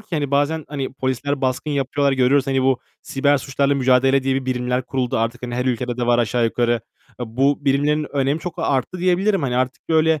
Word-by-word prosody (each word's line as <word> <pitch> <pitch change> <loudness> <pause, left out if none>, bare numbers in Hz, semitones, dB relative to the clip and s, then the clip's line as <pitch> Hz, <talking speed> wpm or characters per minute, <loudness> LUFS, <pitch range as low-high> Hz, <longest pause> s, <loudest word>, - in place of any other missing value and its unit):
ki, 215 - -19
hani, 150 -5 -1
bazen 145 +2 +1
hani 140 -3 -4
polisler 135 +2 -2
baskın 130 +3 -1
yapıyorlar, 140 0 0
görüyoruz. 130 +1 +3
Hani, 135 -1 +1
bu 130 -1 +2 0.2
siber 140 +1 +1
suçlarla 140 +1 0
mücadele 135 0 +3
diye 135 0 0
bir 135 - -2
birimler 125 0 -1
kuruldu. 130 -3 -1
Artık, 115 +2 -2
hani, 120 -1 -4
her 125 +1 -1
ülkede 125 -1 -1
de 120 -1 -2
var 120 0 +3
aşağı 120 +1 +1
yukarı. 120 0 +1 0.4
A 115 -2 -7
bu 140 +2 +2
birimlerin 145 +2 +1
önemi 140 +3 0
çok 175 -2 -5
arttı 145 +2 -1
diyebilirim. 185 +1 +1
Hani 125 -2 -1
artık 130 0 -2
böyle 160 -1 +3
135 Hz, 205 wpm, -21 LUFS, 125-145 Hz, 0.4 s, görüyoruz